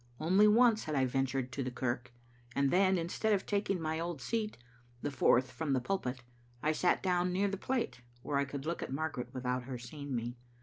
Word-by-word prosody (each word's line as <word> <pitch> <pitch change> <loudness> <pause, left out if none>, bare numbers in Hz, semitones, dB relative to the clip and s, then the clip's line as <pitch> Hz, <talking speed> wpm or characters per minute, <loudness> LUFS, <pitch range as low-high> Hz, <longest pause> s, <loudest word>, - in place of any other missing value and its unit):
Only 190 +7 +5
once 225 +1 +5
had 155 -1 -2
I 135 -1 +3
ventured 130 0 -1
to 135 - -3
the 130 - -2
kirk, 125 0 -2 0.4
and 140 -1 +2
then, 190 +1 +4
instead 180 +6 0
of 195 - 0
taking 200 -2 0
my 160 0 -1
old 170 -2 -3
seat, 215 - -2 0.5
the 145 - -1
fourth 130 -1 +3
from 155 -4 -1
the 130 - +3
pulpit, 125 -5 -2 0.4
I 155 - +3
sat 175 +3 +2
down 180 -1 +2
near 195 +3 +1
the 195 - -2
plate, 200 - -2 0.2
where 145 - 0
I 140 - +2
could 140 0 -6
look 170 +2 -2
at - - -4
Margaret 140 -3 -3
without 125 -1 -2
her 130 -1 -5
seeing 140 +3 -6
me. 120 +1 -3
150 Hz, 210 wpm, -33 LUFS, 130-185 Hz, 0.5 s, Only